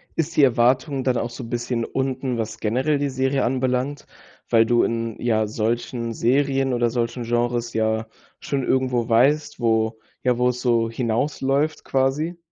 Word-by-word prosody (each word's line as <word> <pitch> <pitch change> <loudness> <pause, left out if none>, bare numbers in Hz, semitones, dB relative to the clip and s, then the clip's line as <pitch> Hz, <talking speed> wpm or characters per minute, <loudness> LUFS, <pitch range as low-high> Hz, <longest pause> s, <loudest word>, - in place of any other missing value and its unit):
Ist 165 +1 -2
die 150 - +6
Erwartung 130 +2 +2
dann 130 -1 +2
auch 120 - -2
so 120 +2 -8
'n 115 - -10
bisschen 120 -1 -2
unten, 130 -2 -2
was 110 -1 -4
generell 130 +7 0
die 145 -1 0
Serie 130 +1 0
anbelangt, 130 +2 -1 0.4
weil 115 -1 +5
du 120 +1 +3
in 115 -1 -2
ja 110 -3 +1
solchen 115 +2 -2
Serien 135 +2 +1
oder 120 -1 +1
solchen 120 0 -2
Genres 120 0 -1
ja 110 0 0 0.3
schon 140 -2 -2
irgendwo 125 -3 +1
weißt, 135 +6 +2
wo 110 -1 +1 0.2
ja, 125 -2 +2
wo 125 0 +3
es 125 0 -3
so 115 -2 +2
hinausläuft 135 +5 -1
quasi. 140 +6 0
125 Hz, 165 wpm, -23 LUFS, 115-135 Hz, 0.4 s, die